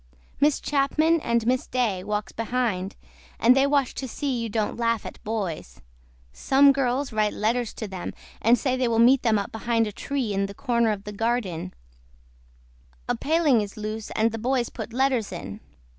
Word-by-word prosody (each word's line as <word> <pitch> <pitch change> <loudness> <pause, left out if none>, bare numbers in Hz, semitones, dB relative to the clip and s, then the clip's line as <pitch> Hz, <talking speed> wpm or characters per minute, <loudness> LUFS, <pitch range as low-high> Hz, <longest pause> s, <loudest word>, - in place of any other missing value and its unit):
MISS 290 +1 +3
CHAPMAN 310 +4 +2
AND 235 -3 0
MISS 250 +1 +1
DAY 225 -8 0
WALKS 210 +1 -3
BEHIND 225 -5 -2 0.4
AND 245 +2 +6
THEY 270 +1 +4
WATCH 280 -3 +1
TO 265 - -5
SEE 270 +2 -2
YOU 230 -1 -3
DON'T 215 0 -1
LAUGH 230 -1 0
AT - - -9
BOYS. 195 - -4 0.5
SOME 275 - +5
GIRLS 265 -1 -1
WRITE 215 -1 +1
LETTERS 235 +2 -1
TO 220 - -5
THEM 190 -2 -6 0.3
AND 235 +3 +5
SAY 260 +1 0
THEY 255 -1 +1
WILL 230 -1 +1
MEET 250 +3 +6
THEM 225 -3 +2
UP 200 - -3
BEHIND 230 0 0
A 210 - -4
TREE 250 0 -3
IN 195 0 0
THE 200 - -10
CORNER 235 -4 +1
OF 200 -2 -4
THE 210 - -7
GARDEN 205 - -2 1.3
A - - +1
PALING 300 -7 +2
IS 205 0 -6
LOSE 215 0 -5
AND 225 +1 +2
THE 225 - -5
BOYS 245 +1 0
PUT 220 -1 -7
LETTERS 255 -3 +1
IN. 100 - -7
230 Hz, 185 wpm, -25 LUFS, 210-260 Hz, 1.3 s, AND